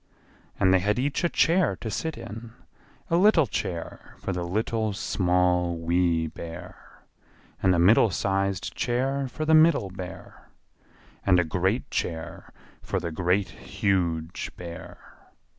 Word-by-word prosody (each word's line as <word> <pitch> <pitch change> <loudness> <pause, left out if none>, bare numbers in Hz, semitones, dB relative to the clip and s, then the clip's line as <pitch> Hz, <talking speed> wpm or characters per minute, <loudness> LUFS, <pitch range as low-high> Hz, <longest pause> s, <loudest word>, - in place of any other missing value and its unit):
And 95 0 +4
they 95 - +5
had 105 +4 0
each 140 +5 -1
a 170 - +3
chair 165 - +2
to 110 +3 -6
sit 145 - -3
in: 115 +2 -9 0.6
a 170 - +4
little 185 -5 +5
chair 90 -6 -5
for 95 - -4
the 90 - -3
Little, 110 +4 -1
Small, 90 -2 +1
Wee 85 0 +1
Bear; 85 +1 -10 0.6
and 90 -1 +4
a - - +1
middle 105 +6 +5
sized 95 +3 -1
chair 135 +3 -1
for 155 +4 -4
the 160 - +3
Middle 155 - +5
Bear; 95 -1 -10 0.7
and 90 - +4
a - - +3
great 95 +8 -1
chair 80 -1 -4 0.3
for - - -2
the 85 - -4
Great, 90 +4 0
Huge 85 -4 -2
Bear. 85 -1 -10
95 Hz, 140 wpm, -26 LUFS, 90-115 Hz, 0.7 s, they